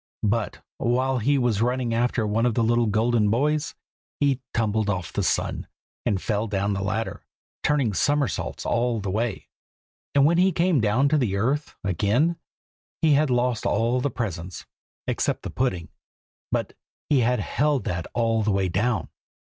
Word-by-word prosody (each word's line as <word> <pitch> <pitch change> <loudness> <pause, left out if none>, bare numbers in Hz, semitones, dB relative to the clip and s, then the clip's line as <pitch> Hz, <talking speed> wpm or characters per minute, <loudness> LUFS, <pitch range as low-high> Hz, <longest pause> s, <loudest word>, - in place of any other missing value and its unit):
But 110 +1 -1 0.2
while 130 +2 +1
he 140 +6 +2
was 120 -5 +1
running 125 0 0
after 120 -1 +1
one 110 +3 +1
of 115 - 0
the 115 - +2
little 120 +1 +2
golden 110 0 +2
boys, 145 +7 0 0.4
he 140 -3 +2
tumbled 110 -2 0
off 95 -4 -3
the - - 0
sun, - - -1 0.4
and 100 - +1
fell 105 +3 -1
down 100 0 0
the 100 - -2
ladder, 110 +3 -3 0.4
turning 140 -8 +1
somersaults 145 - 0
all 120 -1 +1
the 100 -2 -3
way. 110 0 -2 0.7
And 140 0 +6
when 170 +3 +4
he 185 0 +4
came 170 -5 +2
down 110 +6 +3
to 150 0 +3
the 110 -7 0
earth 135 +9 -1
again 105 - +1 0.7
he 155 -2 +5
had 145 +1 +3
lost 125 -2 +1
all 115 +4 +1
the 145 - 0
presents 90 -8 -5 0.4
except - - -1
the - - -5
pudding, 95 -10 -1 0.6
but - - -1 0.3
he 145 - +3
had 125 +1 +2
held 145 -2 0
that 85 -6 -3
all 115 -1 +2
the 105 - 0
way 95 -2 +1
down. 110 +7 0
115 Hz, 165 wpm, -25 LUFS, 105-130 Hz, 0.7 s, And